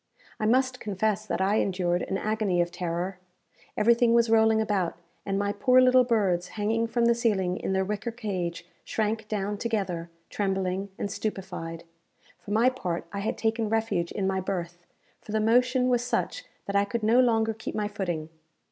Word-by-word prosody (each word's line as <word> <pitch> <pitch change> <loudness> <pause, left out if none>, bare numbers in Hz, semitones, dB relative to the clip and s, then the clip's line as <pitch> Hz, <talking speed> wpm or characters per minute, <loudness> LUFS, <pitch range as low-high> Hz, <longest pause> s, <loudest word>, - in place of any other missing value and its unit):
I 215 - +1
must 255 +2 +2
confess 215 +1 -1
that - - -1
I 200 +3 +2
endured 180 -3 0
an 195 - -2
agony 215 -4 0
of 175 0 +1
terror. 175 +1 -3 0.6
Everything 235 +1 +4
was 235 -1 +3
rolling 220 0 +5
about, 200 -5 0 0.3
and 195 0 0
my 200 0 0
poor 255 +2 +4
little 255 0 +6
birds, 195 -7 +1
hanging 225 +2 +1
from 235 +1 +1
the 235 - +5
ceiling 205 -7 +1
in - - -2
their 190 0 +1
wicker 210 +3 -3
cage, 185 -8 -4 0.2
shrank 220 0 -2
down 205 -1 -2
together, 195 -7 -2 0.2
trembling 195 -1 -1
and 200 - -3
stupefied. 180 -6 -5 0.6
For - - -13
my 220 +4 +3
part, 175 -10 -3
I 200 - -3
had 205 - -2
taken 225 -1 0
refuge 220 -6 0
in 200 - -2
my 190 0 0
berth; 175 -2 -4 0.3
for 210 - -9
the 220 - +2
motion 250 +3 +3
was 245 -1 +2
such, - - -2 0.2
that 200 - -4
I 200 - +5
could 225 +2 -3
no 225 +3 +4
longer 225 -3 +3
keep 220 - -6
my 210 -1 0
footing. 175 -6 -3
210 Hz, 180 wpm, -27 LUFS, 190-225 Hz, 0.6 s, little